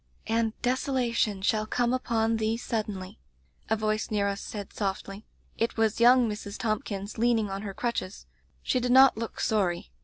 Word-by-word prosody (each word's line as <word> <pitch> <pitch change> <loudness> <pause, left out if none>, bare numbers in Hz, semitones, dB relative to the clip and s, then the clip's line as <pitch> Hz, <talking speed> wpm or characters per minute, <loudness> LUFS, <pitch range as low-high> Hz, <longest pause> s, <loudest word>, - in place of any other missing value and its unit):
"*"^n</ 225 0 +1
desolation 245 -5 0
shall 215 +1 +1
come 245 +2 +1
upon 230 -3 +1
thee 220 +1 0
suddenly^^^ 210 -6 -4 0.5
a 220 - +3
voice 215 0 -1
near 205 -2 +1
us 200 0 -3
said 205 -2 -7
sofdy. 195 0 -4 0.3
It 230 +1 0
was 220 -1 +1
young 245 0 +6
Mrs. 210 -1 -5
Thompkins, 215 -2 -3
leaning 225 -3 +2
on 195 0 -4
her 200 -2 -6
crutches. 235 -5 -3 0.4
She 255 - +1
did 245 0 0
not 265 +1 +7
look 230 +1 -5
sorry. 185 -6 0
220 Hz, 160 wpm, -28 LUFS, 205-235 Hz, 0.5 s, not